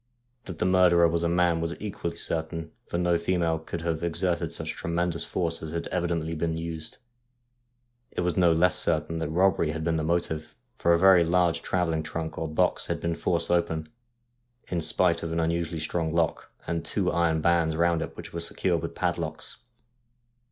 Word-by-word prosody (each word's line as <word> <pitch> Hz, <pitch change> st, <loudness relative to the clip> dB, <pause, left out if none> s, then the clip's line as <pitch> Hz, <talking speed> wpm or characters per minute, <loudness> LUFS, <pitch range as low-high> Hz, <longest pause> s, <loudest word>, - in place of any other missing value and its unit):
That 90 Hz, -4 st, -7 dB
the -, -, 0 dB
mur 90 Hz, 0 st, +5 dB
derer 85 Hz, 0 st, +5 dB
was 85 Hz, 0 st, 0 dB
a 85 Hz, -, +1 dB
man 85 Hz, -1 st, +2 dB
was 85 Hz, +1 st, -2 dB
equally 90 Hz, -5 st, -4 dB
certain, 80 Hz, 0 st, -2 dB, 0.2 s
for -, -, -2 dB
no 85 Hz, -1 st, +2 dB
female 85 Hz, -2 st, 0 dB
could 80 Hz, +1 st, -6 dB
have 85 Hz, -1 st, -2 dB
exerted 85 Hz, -1 st, 0 dB
such 80 Hz, -1 st, -4 dB
tremendous 85 Hz, 0 st, -2 dB
force 85 Hz, -2 st, -2 dB
as 80 Hz, -, -5 dB
had 85 Hz, -, -3 dB
evidently 85 Hz, -2 st, -1 dB
been 80 Hz, 0 st, -1 dB
used. 80 Hz, -1 st, -6 dB, 1.1 s
It -, -, -3 dB
was 90 Hz, 0 st, 0 dB
no 90 Hz, -3 st, +4 dB
less 85 Hz, +2 st, +3 dB
certain 80 Hz, 0 st, 0 dB
that 80 Hz, -2 st, -2 dB
robbery 85 Hz, -1 st, +2 dB
had 80 Hz, 0 st, -4 dB
been 80 Hz, 0 st, +1 dB
the 80 Hz, -, -1 dB
motive, 80 Hz, -1 st, -2 dB, 0.2 s
for 85 Hz, -, +3 dB
a -, -, +5 dB
very 95 Hz, 0 st, +6 dB
large 85 Hz, -1 st, +2 dB
travelling 85 Hz, -3 st, 0 dB
trunk 80 Hz, 0 st, -5 dB
or 80 Hz, -, -2 dB
box 80 Hz, -, +1 dB
had -, -, -2 dB
been 85 Hz, 0 st, -1 dB
forced 85 Hz, 0 st, 0 dB
open, 80 Hz, -2 st, 0 dB, 0.8 s
in 85 Hz, -2 st, -1 dB
spite 85 Hz, +2 st, +2 dB
of 80 Hz, -, -4 dB
an 85 Hz, -, -1 dB
unusually 85 Hz, 0 st, -1 dB
strong 80 Hz, +1 st, -1 dB
lock, 85 Hz, -1 st, -1 dB
and 85 Hz, -1 st, -2 dB
two 90 Hz, +2 st, 0 dB
iron 85 Hz, -2 st, +2 dB
bands 80 Hz, -1 st, +2 dB
round 85 Hz, 0 st, +2 dB
it 80 Hz, -, -6 dB
which -, -, -9 dB
were 85 Hz, -, -3 dB
secured 85 Hz, -, -1 dB
with -, -, -5 dB
padlocks. -, -, -3 dB
85 Hz, 190 wpm, -27 LUFS, 80-85 Hz, 1.1 s, very